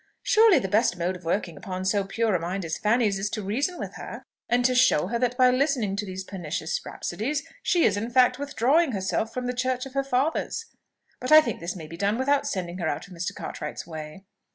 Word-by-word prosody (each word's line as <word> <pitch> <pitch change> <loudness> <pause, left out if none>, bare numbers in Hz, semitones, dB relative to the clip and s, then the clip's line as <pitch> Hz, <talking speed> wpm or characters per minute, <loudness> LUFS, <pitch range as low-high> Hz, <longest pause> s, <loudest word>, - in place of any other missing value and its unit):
Surely 445 -4 +6
the 190 - 0
best 205 -1 +2
mode 175 +2 -1
of 180 -1 -12
working 170 -1 -1
upon 185 +2 -5
so 200 +1 +2
pure 220 +2 0
a 180 - +2
mind 180 +2 -3
as 160 - -3
Fanny's 210 -2 +2
is 200 +1 -1
to 215 -1 -4
reason 275 - -1
with - - -6
her, - - -8 0.3
and 245 0 +2
to 255 - +4
show 250 -11 +4
her 235 +1 -1
that 250 0 0
by 255 -1 +6
listening 255 -6 +1
to 205 0 -3
those 190 0 -5
pernicious 175 -4 -4
rhapsodies 275 +11 -3 0.2
she 345 -7 +2
is 200 - +4
in 220 +3 -3
fact 250 +1 +4
withdrawing 285 +2 +2
herself 195 +3 -1
from 250 +1 -4
the 250 - -1
church 255 +1 -1
of 270 - -10
her 275 0 +1
fathers; 275 - -1 0.5
but 255 - -4
I 310 - +11
think 310 - -2
this 170 +3 -4
may 165 -4 -8
be 165 +2 -9
done 200 +4 +1
without 280 +2 +1
sending 185 -7 -3
her - - -1
out - - -3
of 180 - -13
Mr. 175 0 -3
Cartwright's - - -6
way." 160 +3 -8
220 Hz, 230 wpm, -26 LUFS, 185-255 Hz, 0.5 s, I